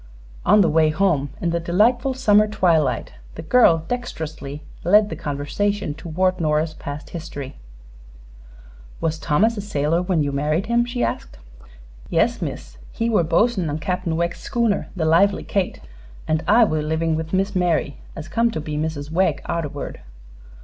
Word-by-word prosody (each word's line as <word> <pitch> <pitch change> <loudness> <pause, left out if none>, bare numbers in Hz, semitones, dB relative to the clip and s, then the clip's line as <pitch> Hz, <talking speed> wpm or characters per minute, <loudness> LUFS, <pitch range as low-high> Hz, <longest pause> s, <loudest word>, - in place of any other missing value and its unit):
On 210 +3 +6
the 180 - +4
way 155 0 +3
home, 155 -4 +1
in 170 - 0
the 170 - 0
delightful 235 +10 +2
summer 215 -5 +4
twilight, 165 - +1 0.2
the - - -7
girl 165 -6 +4
dexterously 155 - -5 0.2
led 210 +4 +5
the - - -4
conversation 155 +6 -2
toward 180 +4 -1
Nora's 155 0 +1
past 145 0 -8
history. 150 -5 -7 1.4
"Was 160 -1 -1
Thomas 210 +11 +2
a - - -2
sailor 165 -4 0
when 180 -4 +1
you 145 - -1
married 150 +6 0
him?" 235 +1 +2
she 245 0 -2
asked. - - -3 0.7
"Yes, - - +1
miss. - - -6
He 230 +1 -1
were 210 -6 +3
bos'n 180 +2 +1
on 145 - -2
Cap'n 165 +1 -2
Wegg's 170 +1 -1
schooner 230 -4 0
the 165 -4 -1
'Lively 190 +5 +3
Kate,' 195 -3 -2 0.5
an' 155 0 +1
I 230 +5 +6
were 155 -8 +1
livin' 160 +1 0
with 160 +1 -4
Miss 195 +2 0
Mary, 170 -6 0 0.2
as 155 -1 -7
come 230 +7 +1
to 225 - -4
be 150 -1 -5
Mrs. 155 -1 -3
Wegg 165 -4 +1
arterward." 150 -4 -4
170 Hz, 160 wpm, -22 LUFS, 155-205 Hz, 1.4 s, On